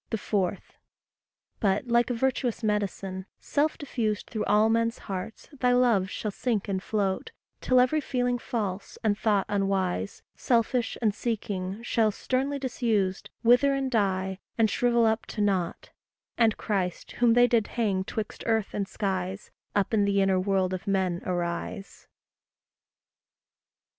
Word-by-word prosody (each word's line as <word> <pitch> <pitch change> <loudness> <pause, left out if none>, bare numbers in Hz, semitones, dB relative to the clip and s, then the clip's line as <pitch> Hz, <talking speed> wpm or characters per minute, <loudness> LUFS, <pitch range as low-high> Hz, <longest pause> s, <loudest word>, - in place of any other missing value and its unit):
4. 200 -2 0 1.0
But, 200 +2 +1
like 235 +1 +3
a 245 - 0
virtuous 250 -1 -1
medicine, 195 -2 -2
self 300 +2 0
diffused 220 -7 -2
Through 220 - -2
all 210 +1 +4
men's 230 +1 +1
hearts 195 +2 -6
thy 250 -3 +2
love 235 -7 +3
shall 210 - -3
sink 220 -1 -1
and 190 -2 -1
float; 200 - -1 0.3
Till 255 -1 +4
every 255 +5 +3
feeling 245 -2 0
false, 205 -5 -4
and 215 -2 +2
thought 205 -2 +1
unwise, 190 - -1
Selfish, 235 0 +1
and 215 -2 +3
seeking, 205 -2 -3
shall, 225 -2 +2
sternly 265 +6 -1
disused, 225 -8 -1
Wither, 245 +4 +5
and 270 -1 -1
die, 190 -4 0 0.2
and 220 -2 +3
shrivel 240 -1 +3
up 220 0 +1
to 210 - -4
nought; 190 -4 -1 0.4
And 225 -3 +3
Christ, 185 -4 -2
whom 235 -2 +6
they 245 0 +7
did 230 -3 +2
hang 200 -5 +1
'twixt 210 +2 -5
earth 225 -2 +1
and 200 -1 -2
skies, 190 -1 -3 0.2
Up 205 +1 +1
in 205 -2 +3
the 200 0 +2
inner 195 -1 +3
world 190 -1 +1
of 185 +3 -5
men 185 -3 0
arise. 175 +3 -4
210 Hz, 145 wpm, -27 LUFS, 195-235 Hz, 1.0 s, they